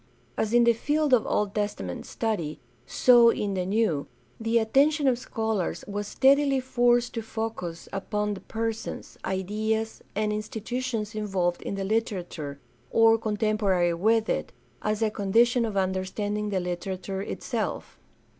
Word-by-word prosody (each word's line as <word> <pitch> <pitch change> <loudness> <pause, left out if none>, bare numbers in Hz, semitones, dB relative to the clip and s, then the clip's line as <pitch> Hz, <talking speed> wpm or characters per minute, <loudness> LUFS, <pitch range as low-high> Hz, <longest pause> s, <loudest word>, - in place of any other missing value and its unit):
As 220 - -1
in 240 0 +5
the 235 0 +5
field 295 +4 0
of 240 - +4
Old 205 -1 0
Testament 205 - -3
study, 175 -10 -2 0.3
so 240 - +6
in 205 -3 -1
the 185 -1 -2
New, 195 -8 +1 0.3
the 225 +1 +1
attention 280 +6 +3
of 245 -2 +3
scholars 220 -6 -2
was 205 0 -3
steadily 275 +2 +4
forced 245 -1 +2
to 230 - -2
focus 220 -7 -5
upon 210 +1 -1
the 195 - -7
persons, 225 0 -4
ideas, 215 +4 -2
and 210 0 0
institutions 225 +1 -3
involved 190 -5 -1
in - - -4
the 195 - -3
literature, 185 -9 -2 0.3
(Sr 225 0 +5
contemporary 210 -5 +1
with 220 +5 +2
it, - - -1 0.3
as 215 +1 0
a 215 - +1
condition 230 +4 +3
of 210 -3 -3
understanding 195 +3 -1
the 195 -2 0
literature 185 +2 -4
itself. - - -4
215 Hz, 140 wpm, -27 LUFS, 195-230 Hz, 0.3 s, so